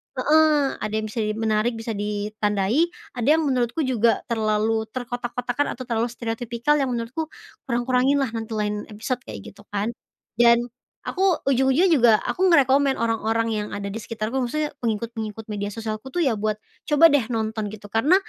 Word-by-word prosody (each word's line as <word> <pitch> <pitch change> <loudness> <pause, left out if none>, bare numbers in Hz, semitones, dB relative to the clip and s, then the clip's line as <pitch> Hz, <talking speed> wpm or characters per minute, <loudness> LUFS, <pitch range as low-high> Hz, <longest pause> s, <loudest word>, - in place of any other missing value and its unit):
heeh, 300 +1 +3
ada 215 - -4
yang 220 0 -1
bisa 230 - -4 0.2
menarik, 220 +1 +1
bisa 225 0 -5
ditandai, 210 - 0 0.3
ada 240 0 -1
yang 320 - +1
menurutku 255 0 0
juga 235 -4 +2
terlalu 220 0 +1
terkotak-kotakkan 245 +2 -2
atau 255 - -7
terlalu 235 -1 0
stereotipikal 235 +4 -1
yang 270 - +1
menurutku 240 +7 -3 0.4
kurang-kurangin 255 +2 +2
lah 265 - 0
nanti 225 -1 -5
lain 210 -1 -2
episode 245 +4 -3
kayak 105 -2 -7
gitu 205 +1 -18
kan." 205 +2 0 0.5
Dan 235 0 +6 0.5
aku 375 - -3 0.2
ujung-ujungnya 265 +6 +3
juga 240 -6 +6
aku 375 +1 +2
nge-recommend 275 -3 +4
orang-orang 225 0 0
yang 210 -1 -2
ada 200 0 -4
di 225 - -4
sekitarku, 230 +4 -3
maksudnya 300 +5 -2
pengikut-pengikut 225 -1 -3
media 205 0 -3
sosialku 220 +2 -5
tuh 350 +6 -1
ya 260 - +3
buat, 215 0 -1 0.3
"Coba 300 +2 +6
deh 285 - +5
nonton!" 220 -2 -2
Gitu, 210 0 -10
karena 275 +11 +4
230 Hz, 160 wpm, -23 LUFS, 215-265 Hz, 0.5 s, Dan